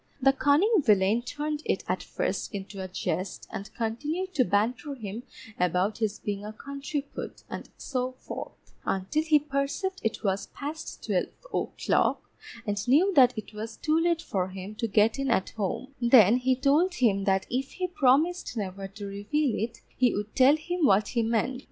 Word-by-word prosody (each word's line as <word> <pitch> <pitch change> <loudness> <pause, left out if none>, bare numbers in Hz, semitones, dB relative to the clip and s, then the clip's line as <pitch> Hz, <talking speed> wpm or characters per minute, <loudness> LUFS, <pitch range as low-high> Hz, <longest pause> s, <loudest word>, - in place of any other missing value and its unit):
The 270 0 +5
cunning 325 +10 +4
villain 210 0 +4
turned 290 +3 -3
it - - -1
at - - -1
first - - -3
into 195 0 -6
a - - -4
jest 185 0 -3
and 200 - -6
continued 300 +12 -2
to 275 - +4
banter 245 +7 0
him 220 -2 -6 0.4
about 180 +4 +1
his 215 -2 0
being 205 -1 -4
a 210 - -5
country 280 +5 -4
put, - - -7
and - - -6
so 255 -1 -2
forth, 255 - -9
until 195 +10 0
he 315 -1 +4
perceived 295 +7 -2
it 225 - -2
was 195 -1 0
past 300 +3 -6
twelve - - +1 0.3
o'clock, - - 0 0.4
and 205 +2 -2
knew 335 +10 +4
that 250 -6 +6
it 215 0 -6
was 220 +2 -6
too 315 +1 +2
late 335 0 +1
for 185 -2 -1
him 190 +2 -7
to 230 - -1
get 220 +4 +3
in 275 0 0
at 210 -6 +1
home; 225 +6 -3
then 235 -2 +7
he 255 +1 +2
told 300 +8 +3
him 200 - +2
that 190 -1 +2
if 265 +2 -2
he 370 - -2
promised 320 -1 +2
never 195 -1 -4
to 200 +1 -9
reveal 215 +8 -1
it, 225 +2 -3 0.2
he 250 -2 +3
would 210 +1 -4
tell 265 +3 +6
him 345 +2 -3
what 205 -6 +4
he 235 - +1
meant. 230 +3 0
245 Hz, 180 wpm, -28 LUFS, 205-290 Hz, 0.4 s, then